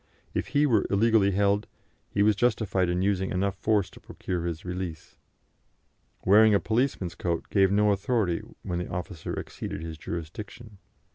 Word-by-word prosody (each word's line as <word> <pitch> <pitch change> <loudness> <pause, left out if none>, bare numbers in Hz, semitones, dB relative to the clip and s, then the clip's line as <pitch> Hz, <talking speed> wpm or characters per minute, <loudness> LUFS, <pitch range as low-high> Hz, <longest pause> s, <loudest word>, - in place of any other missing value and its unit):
If - - -2
he 150 - +5
were 115 -8 +2
illegally 105 0 +4
held, 100 +2 +1 0.4
he 100 - +1
was 105 0 +4
justified 105 -5 +1
in 90 +1 0
using 95 -1 +1
enough 95 +1 0
force 105 0 +1
to - - -14
procure 85 -2 -4
his 85 0 -5
release. 90 -3 -5 1.1
Wearing 105 +2 +6
a - - +4
policeman's 110 -6 0
coat 85 -1 -2
gave 95 -1 +4
no 105 +1 +4
authority 100 -3 0 0.2
when 90 -1 -2
the 90 - -4
officer 90 -2 -5
exceeded 80 - -6
his 80 -1 -7
jurisdiction. 100 +7 -7
100 Hz, 155 wpm, -27 LUFS, 90-105 Hz, 1.1 s, Wearing